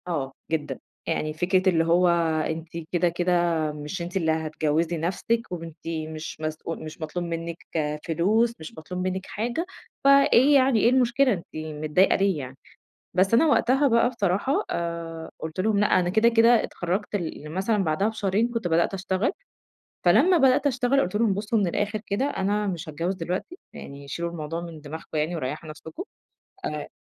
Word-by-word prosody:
آه، 145 -6 -2 0.2
جدًا، 155 -2 -2 0.3
يعني 155 0 -1
فكرة 185 +4 +2
اللي 165 -3 +3
هو 175 +2 +4 0.4
أنتِ 160 +1 -4 0.2
كده 175 0 +2
كده 175 +1 -1 0.4
مش 150 +5 -6
أنتِ 175 +3 -3
اللي 160 -3 +1
هتجوّزي 160 +1 0
نفسكِ، 190 +8 0
وأنتِ 165 -2 -8 0.2
مش 155 0 -7
مسؤ 155 +1 -4
مش 155 +1 -9
مطلوب 175 +3 -3
منِّك 165 0 -4 0.5
فلوس، 215 +8 +2
مش 160 - -9
مطلوب 180 +3 -5
منِّك 190 +1 -3
حاجة. 240 - -3 0.4
فإيه 275 0 +6
يعني؟ 260 -4 +4
إيه 230 - +5
المشكلة؟ 255 +1 +3
أنتِ 170 -4 -5
متضايقة 155 +3 +1
ليه 195 -3 +2
يعني؟ 130 -1 -8 0.6
بس 185 +4 +2
أنا 240 +8 +6
وقتها 275 -1 +3
بقى 235 -1 +4
بصراحة 210 +3 0
آآ، 170 -1 -4
قُلت 160 +3 -6
لهم 205 +1 +2
لأ، 205 -2 +4
أنا 175 -1 0
كده 220 +5 +4
كده 230 0 +5
اتخرجت 190 +4 -3
ل 160 -5 -4
مثلًا 190 +7 0
بعدها 160 +5 +1
بشهرين 220 0 0
كنت 230 -6 -2
بدأت 170 +3 +2
أشتغل. 190 +3 0 0.7
فلما 365 0 +5
بدأت 270 0 +4
أشتغل 265 0 +2
قلت 180 - -2
لهم: 215 -2 +2
بصّوا 210 +3 0
من 200 - +2
الآخر 205 +4 -1
كده، 200 +7 0
أنا 210 -5 0
مش 175 -3 -4
هاتجوز 170 +5 -2
دلوقتي، 185 - -4
يعني 140 0 -10
شيلوا 170 +4 -3
الموضوع 165 0 -4
من 170 -2 -8
دماغكم 155 +2 -8
يعني، 160 +3 -1
وريحوا 150 +2 -4
نفسكم 160 - -8 0.6
آآ 150 -1 -4
180 Hz, 165 wpm, -25 LUFS, 160-220 Hz, 0.7 s, فإيه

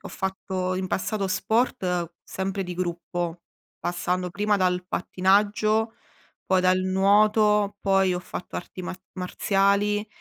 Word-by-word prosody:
ho - - -8
fatto 190 -1 -3
in 185 0 -2
passato 200 +1 -1
sport 185 -4 0
sempre 195 +1 -3
di 180 - -5
gruppo, 175 -1 -3 0.4
passando 180 +1 -2
prima 205 +3 +1
dal 180 -1 +1
pattinaggio, 210 +4 +2 0.5
poi 190 -1 +3
dal 185 0 +4
nuoto, 205 +2 +3
poi 195 -2 +3
ho 180 - -2
fatto 180 - -7
arti 185 - -7
mar 180 +1 -6
marziali. 200 +3 +1
190 Hz, 125 wpm, -25 LUFS, 180-205 Hz, 0.5 s, dal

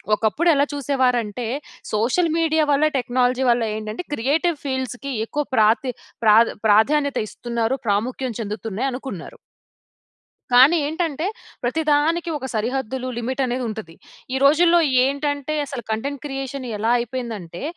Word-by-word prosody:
ఒకప్పుడు 230 +12 +1
ఎలా 285 0 +3
చూసేవారంటే, 250 -5 0 0.5
social 250 +11 +2
media 320 -1 +2
వల్ల, 285 +2 +3
టెక్నాలజీ 250 0 +1
వల్ల 240 0 +3
ఏంటంటే, 215 +8 -5
క్రియేటివ్ 305 +7 +1
ఫీల్డ్స్‌కి 260 0 -3
ఎక్కువ 295 +6 -2
ప్రాతి 225 +4 +3 0.3
ప్రాధ 220 +1 +6 0.2
ప్రాధాన్యత 280 +7 +3
ఇస్తున్నారు. 235 +2 -2
ప్రాముఖ్యం 245 +5 -1
చెందుతున్నాయి 215 +4 -3
అనుకున్నారు. 250 -9 -7 1.2
కానీ 270 +7 +7
ఏంటంటే, 320 0 -2 0.4
ప్రతి 255 +7 0
దానికి 325 +4 +2
ఒక 265 - -7
సరిహద్దులు, 255 +3 -2
లిమిటనేది 255 +1 -1
ఉంటది. 210 -7 -7 0.4
ఈ - - +2
రోజుల్లో 340 +4 +5 0.3
ఏంటంటే, 285 +1 -1
అసల 270 -3 -6
కంటెంట్ 275 +6 -3
క్రియేషన్ 270 -1 -5
ఎలా 220 +3 +1
అయిపోయిందంటే, 230 -8 -5
260 Hz, 120 wpm, -22 LUFS, 225-285 Hz, 1.2 s, కానీ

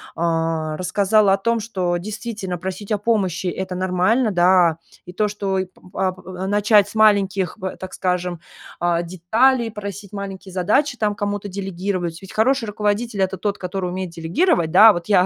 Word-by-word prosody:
А, 165 -2 -1
рассказала 200 +3 +3
о 195 - +3
том, 230 +3 0
что 185 -6 -2
действительно 210 -1 -5
просить 190 +4 -6
о 210 - +2
помощи- 195 -5 0
это 185 +1 -3
нормально, 185 +6 +1
да. 175 -2 +4 0.3
И 180 - -10
то, 210 +3 +1
что 200 -2 -2
и 190 - -1
п 180 - -25
а 190 -1 0
п 185 - -14
а 185 +1 -5
начать 205 0 +4
с - - -13
маленьких, 200 -4 +3
б 190 0 -4
так 185 0 -8
скажем, 180 -2 -2 0.4
а, 175 -1 +1
деталей, 225 +8 +2
просить 200 -1 -7
маленькие 195 -1 -7
задачи, 245 +9 +1
там 210 -2 0
кому-то 205 0 -3
делегировать. 185 -3 -4
Ведь 190 - -11
хороший 245 +3 +2
руководитель- 210 0 -1
это 190 0 0
тот, 205 +2 -2
который 180 0 -3
умеет 185 0 -4
делегировать. 170 - +1
Да, 210 +6 +9
а - - +6
вот 175 -2 -5
я 190 -3 +4
190 Hz, 180 wpm, -21 LUFS, 180-210 Hz, 0.4 s, Да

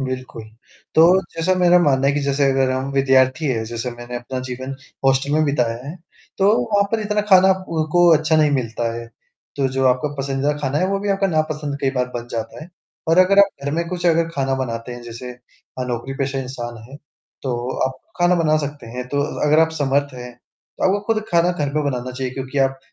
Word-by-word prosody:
बिल्कुल। 130 -3 -5 0.5
तो 160 - +6 0.3
जैसा 165 +3 +1
मेरा 180 0 +5
मानना 135 -5 +2
है 140 - +3
कि 145 - 0
जैसे 140 0 +1
अगर 135 -1 +2
हम 130 +1 -2
विद्यार्थी 135 +2 +3
हैं, 115 -5 -1
जैसे 115 +2 -4
मैंने 120 +1 -7
अपना 120 +2 -5
जीवन 130 +2 -5 0.3
हॉस्टल 135 +1 +2
में 155 +1 +3
बिताया 125 -6 0
है, 150 - -6 0.4
तो 195 - +3 0.3
वहाँ 200 0 +4
पर 225 - +1
इतना 210 0 0
खाना 190 0 +7 0.2
उ 160 -2 0
को 175 0 +5
अच्छा 155 +1 +1
नहीं 155 -1 +4
मिलता 115 -3 -1
है, 115 0 -6 0.5
तो 135 -2 +1
जो 130 0 -1
आपका 130 +3 +2
पसंदीदा 135 +1 0
खाना 145 0 -1
है 185 - +1
वो 195 0 0
भी 205 - -3
आपका 195 0 +1
नापसंद 155 -4 -1
कई 135 - +1
बार 125 -2 -1
बन 120 0 -4
जाता 115 +6 -5
है। - - -9 0.4
पर 165 +2 +3
अगर 185 +2 +5
आप 200 0 +7 0.2
घर 140 - -1
में 170 +1 -1
कुछ 180 0 -3
अगर 165 -1 +3
खाना 135 -1 0
बनाते 120 -2 -4
हैं, 120 0 -9
जैसे 120 +1 -8
अ, 125 +1 -10
नौकरी-पेशा 135 +3 -3
इंसान 125 -2 -6
हैं, 135 - -10 0.5
तो 125 -1 -3
आप 130 0 -6 0.2
खाना 175 0 +4
बना 160 -3 +2
सकते 145 -4 -7
हैं 125 +2 -6
तो 145 +2 0
अ, 145 - -3
अगर 150 +1 +4
आप 160 0 +3
समर्थ 140 0 +1
हैं, 125 -1 -8 0.5
तो - - -1
आपको 195 +2 +2
खुद 215 -1 -1
खाना 170 0 +3
घर 150 -5 -2
पे 150 - +1
बनाना 125 -1 -3
चाहिए, 130 0 -4
क्योंकि 135 +1 -4
आप 135 0 +1
135 Hz, 215 wpm, -20 LUFS, 125-160 Hz, 0.5 s, खाना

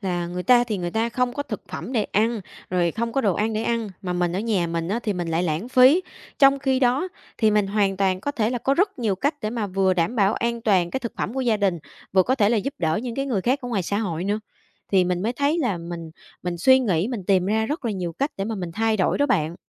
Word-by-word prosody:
là 175 -3 -2
người 180 +1 -4
ta 245 +1 +5
thì 215 -5 -3
người 175 -1 -3
ta 225 +3 0
không 245 +1 0
có 285 - -3
thực - - -6
phẩm - - -6
để 220 -4 +1
ăn, 220 +1 +1 0.3
rồi 175 -2 +2
không 230 +3 -3
có 270 - +1
đồ 200 -7 +1
ăn 220 +1 0
để 215 +1 -1
ăn, 230 -2 -1
mà 180 -1 -2
mình 175 -1 0
ở - - -1
nhà 205 -6 0
mình 165 0 -3
á 215 +4 0
thì 210 - 0
mình 175 -2 -3
lại 165 +2 0
lãng 170 +7 -2
phí. 260 +7 +6 0.4
Trong 275 -1 +6
khi 265 -1 0
đó, 260 +8 +2 0.3
thì 220 -2 +4
mình 210 -1 +2
hoàn 200 -1 +1
toàn 190 -1 +1
có 285 - -2
thể 225 -5 0
là 245 - -1
có 275 +4 +1
rất 385 -2 +1
nhiều 215 -5 0
cách 285 - 0
để 215 - -2
mà 225 -3 -2
vừa 190 -1 +1
đảm 175 +8 0
bảo 200 0 +3
an 235 0 -1
toàn 185 -6 +2
cái 265 - -2
thực 235 -2 -5
phẩm 220 - -2
của 265 - -1
gia 235 -4 +2
đình, 195 -5 +1 0.3
vừa 190 -1 +5
có 260 - +1
thể 210 -5 +3
là 235 - +2
giúp 275 +7 -2
đỡ 160 -2 +1
những 240 -2 -4
cái 275 0 -2
người 220 -8 0
khác 255 +7 +1
ở 245 - -5
ngoài 200 -6 -1
xã 200 +4 -1
hội 180 -5 -2
nữa. 205 +2 -1 0.5
Thì 185 -2 +5
mình 180 0 -1
mới 230 +3 0
thấy 285 +6 +1
là 240 - 0
mình 170 -1 -7 0.3
mình 175 -1 -3
suy 260 +8 +6
nghĩ, 200 -5 0
mình 225 -8 -4
tìm 185 -2 +3
ra 220 +2 +1
rất 295 -2 -4
là 230 - 0
nhiều 180 -3 -3
cách 280 - -1
để 195 - -2
mà 225 +1 -3
mình 175 -4 -5
thay 220 +1 +1
đổi 190 - +1
đó 285 - +3
bạn. 160 - +1
215 Hz, 290 wpm, -23 LUFS, 180-245 Hz, 0.5 s, phí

